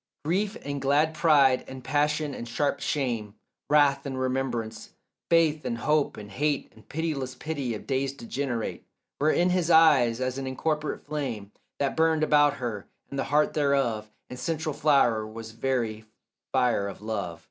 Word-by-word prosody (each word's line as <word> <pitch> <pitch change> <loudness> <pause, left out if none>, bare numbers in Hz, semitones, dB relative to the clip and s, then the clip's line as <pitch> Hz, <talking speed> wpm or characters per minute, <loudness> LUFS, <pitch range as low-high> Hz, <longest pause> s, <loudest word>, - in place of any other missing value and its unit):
Grief 200 +7 0
and 140 -1 -4
glad 145 +3 +2
pride 140 -6 +4
and 130 -1 -9
passion 150 +1 0
and 120 - -6
sharp 140 +5 0
shame, 115 -7 -2 0.3
Wrath 145 -2 +4
and 135 -2 -4
remembrance, 125 -4 -3 0.3
faith 160 -2 +3
and 115 - -2
hope 150 +4 +1
and 105 -1 -9
hate 145 +6 -1
And - - -20
pitiless 145 -5 -3
pity 140 -4 -3
of - - -9
days 135 0 0
degenerate, 125 -2 -4 0.4
Were 150 +2 +3
in 175 +3 +3
his 180 -2 +1
eyes 145 -8 +5
as 130 +1 -2
an 135 - -4
incorporate 150 +3 -2
flame 130 -9 -4 0.3
That 140 -1 -1
burned 160 -1 +3
about 145 -2 +4
her, 115 -7 -5 0.2
and 140 - -3
the - - 0
heart 150 +2 +2
thereof 135 -7 +1 0.2
And 125 - -9
central 160 +3 -2
flower 120 -8 +3
was 110 +1 -8
very 115 -2 -2 0.5
fire 125 -6 +2
of 100 +1 -8
love. 100 -6 -3
135 Hz, 160 wpm, -27 LUFS, 120-150 Hz, 0.5 s, eyes